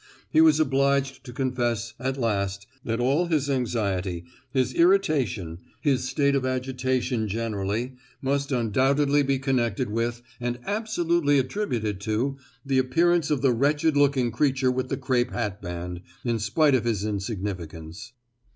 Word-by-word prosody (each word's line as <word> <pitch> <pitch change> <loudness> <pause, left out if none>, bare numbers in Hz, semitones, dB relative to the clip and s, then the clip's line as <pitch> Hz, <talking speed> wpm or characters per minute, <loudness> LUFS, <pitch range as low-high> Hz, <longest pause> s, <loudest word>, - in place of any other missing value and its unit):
He 155 - +5
was 160 -1 +6
obliged 140 -2 +1
to 125 - -8
confess 120 -3 -1
at 130 +1 -2
last, 100 -5 -1 0.2
that 115 0 -2
all 140 +8 +2
his 145 -4 +1
anxiety, 100 -9 -1 0.3
his 130 -1 +1
irritation, 145 - +2 0.2
his 130 -1 +1
state 140 -1 +2
of 135 -2 +1
agitation 130 -2 -1
generally, 110 +3 -2 0.2
must 140 +2 -1
undoubtedly 135 +5 +2
be 135 -1 +1
connected 125 -4 0
with, 115 +2 -2 0.2
and 120 0 -2
absolutely 170 -8 +1
attributed 125 - -1
to, 115 +7 -1 0.3
the 135 -1 +2
appearance 165 +5 +2
of 145 -3 0
the 130 -3 +4
wretched 145 +5 +2
looking 140 -4 +3
creature 130 0 +2
with 130 0 -2
the - - -1
crape 130 -2 0
hatband, 90 -5 -4 0.2
in 120 -2 0
spite 135 +8 +2
of 125 -3 +3
his 105 -4 0
insignificance. 95 -1 -5
130 Hz, 140 wpm, -25 LUFS, 110-140 Hz, 0.3 s, was